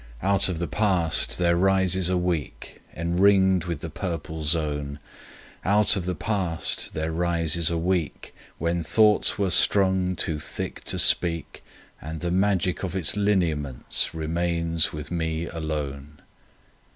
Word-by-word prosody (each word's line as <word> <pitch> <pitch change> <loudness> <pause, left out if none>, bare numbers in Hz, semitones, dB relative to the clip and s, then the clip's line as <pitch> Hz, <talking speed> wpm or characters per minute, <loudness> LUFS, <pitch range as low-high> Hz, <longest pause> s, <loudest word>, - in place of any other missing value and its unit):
— - - -17
Out 95 - +4
of 90 - -3
the 85 - -2
past 90 -7 +1
there 85 -1 +2
rises 95 0 +2
a 90 - +1
week 90 -6 -4 0.2
Enringed 95 +1 +2
with 85 -4 -5
a 85 - -4
purple 80 -3 -5
zone. 75 -2 -1 0.7
Out 105 +2 +4
of 95 -4 -3
the 90 0 -2
past 90 -3 -1
there 80 +1 -2
rises 85 -1 +1
a 85 - -2
week 85 -2 -2 0.2
When 85 +2 -1
thoughts 105 +5 +3
were 100 -3 0
strung 95 0 +3
too 80 -3 +1
thick - - -5
to - - -2
speak, 85 -2 +2 0.4
And 80 +1 -7
the 85 +1 -3
magic 95 -1 0
of 95 -1 -4
its 95 -3 0
lineaments 85 -10 -1
remains 85 0 -1
with 75 +1 -8
me 80 -1 -2
alone. 75 -3 -6
85 Hz, 140 wpm, -24 LUFS, 80-95 Hz, 0.7 s, Out